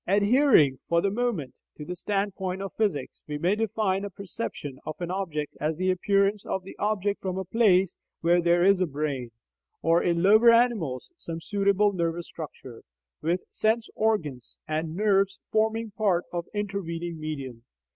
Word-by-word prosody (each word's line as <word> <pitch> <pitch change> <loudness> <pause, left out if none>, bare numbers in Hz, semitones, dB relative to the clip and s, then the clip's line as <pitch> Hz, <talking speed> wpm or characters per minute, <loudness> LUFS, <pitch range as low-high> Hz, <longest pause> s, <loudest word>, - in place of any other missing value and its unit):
Adhering, 200 - +4
for 170 - +4
the 195 +3 +1
moment, 205 - -1 0.2
to 150 - -7
the 180 - -5
standpoint 190 -1 -2
of 195 -2 -5
physics, 195 -12 -2
we 150 -1 -3
may 175 +6 +2
define 210 -3 0
a 205 - -4
"perception" 180 - -6
of 155 - -5
an 175 0 -3
object 165 -6 -3
as 155 +1 0
the 185 +1 +2
appearance 200 +2 +1
of 190 - -3
the 190 - -10
object 205 -1 0
from 185 -1 -3
a 190 - -3
place 190 -3 +3 0.3
where 175 +1 +4
there 175 +1 +3
is 195 -1 +5
a 185 - +2
brain 140 -4 -3 0.5
(or, 165 +2 +4
in 170 -1 +1
lower 215 +4 +7
animals, 230 - +2
some 165 - -6
suitable 200 +2 +2
nervous 170 -1 -1
structure), 135 -6 -9 0.4
with 175 +3 0
sense 225 +1 +1
organs 155 - -1
and 155 +1 -2
nerves 195 -1 +2
forming 220 0 +1
part 195 -4 +1
of 170 -1 -2
the 205 - -3
intervening 175 -5 -4
medium. 135 -6 -6
185 Hz, 165 wpm, -27 LUFS, 165-205 Hz, 0.5 s, lower